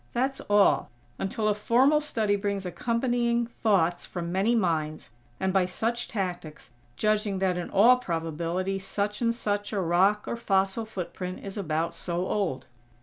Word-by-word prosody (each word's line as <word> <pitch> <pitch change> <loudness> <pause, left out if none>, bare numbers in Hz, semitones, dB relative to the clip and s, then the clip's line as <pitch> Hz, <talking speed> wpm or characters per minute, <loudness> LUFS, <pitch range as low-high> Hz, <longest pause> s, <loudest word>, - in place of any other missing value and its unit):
That's 265 +3 -1
all; 200 -9 +4 0.3
until 215 +2 -1
a 210 - +4
formal 255 +8 +3
study 220 -8 0
brings 200 -1 -2
accompanying 235 +4 0
thoughts 195 -7 +1
from 170 -1 -5
many 200 +6 +2
minds; 155 - -1 0.3
and, 190 0 0
by 190 -2 +3
such 230 +6 -2
tactics, 175 - -5 0.3
judging 210 -2 +1
that 185 -1 +1
in 175 -1 -4
all 240 +6 +6
probability 170 -1 -2
such 205 +2 -3
and 235 - +3
such 205 -3 -2
a 205 - -1
rock 190 +4 +2
or - - -2
fossil 195 0 +1
footprint 185 -3 -6
is 195 - -6
about 165 -4 -1
so 175 +1 -3
old. 185 -10 -1
195 Hz, 150 wpm, -27 LUFS, 180-225 Hz, 0.3 s, all